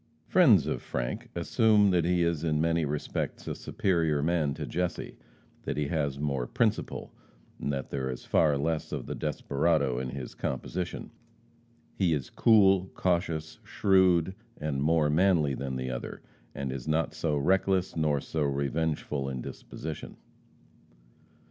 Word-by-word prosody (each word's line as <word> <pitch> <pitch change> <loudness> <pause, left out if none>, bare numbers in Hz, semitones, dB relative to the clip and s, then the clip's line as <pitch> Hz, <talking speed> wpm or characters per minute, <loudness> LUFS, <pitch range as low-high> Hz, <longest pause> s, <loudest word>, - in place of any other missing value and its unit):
Friends - - +5
of - - -2
Frank - - -4
assume 105 -3 +4
that 85 -2 +2
he 90 0 +2
is 85 -2 0
in 75 -2 +1
many 80 0 +2
respects 75 0 -3
a - - -1
superior 80 -6 0
man 80 -4 +1
to 75 -1 -4
Jesse; 90 +3 -3 0.5
that - - -4
he 75 -2 -1
has 70 -4 -1
more 70 -4 -1
principle, - - -1 0.5
and 70 - -2
that 70 -1 -4
there 65 -1 -2
is 65 - -6
far 75 -3 +3
less 80 +2 -2
of - - -4
the - - -4
desperado 70 -3 0
in 65 0 -3
his 65 0 -6
composition. 85 +7 -4 0.8
He 85 -4 +2
is 70 -4 -5
cool, 95 -4 +5
cautious, 85 -3 -1
shrewd, 95 -2 +3 0.3
and 75 -3 -2
more 75 0 +3
manly 80 -4 +3
than 65 0 -4
the 65 0 -3
other, - - -6 0.3
and 70 -2 -3
is 65 0 -6
not 80 +1 +1
so 75 -3 -1
reckless 95 +4 +1
nor 75 -3 +1
so 80 - -3
revengeful 70 0 -1
in 65 -1 -4
disposition. 80 +4 -7
75 Hz, 150 wpm, -29 LUFS, 70-85 Hz, 0.8 s, Friends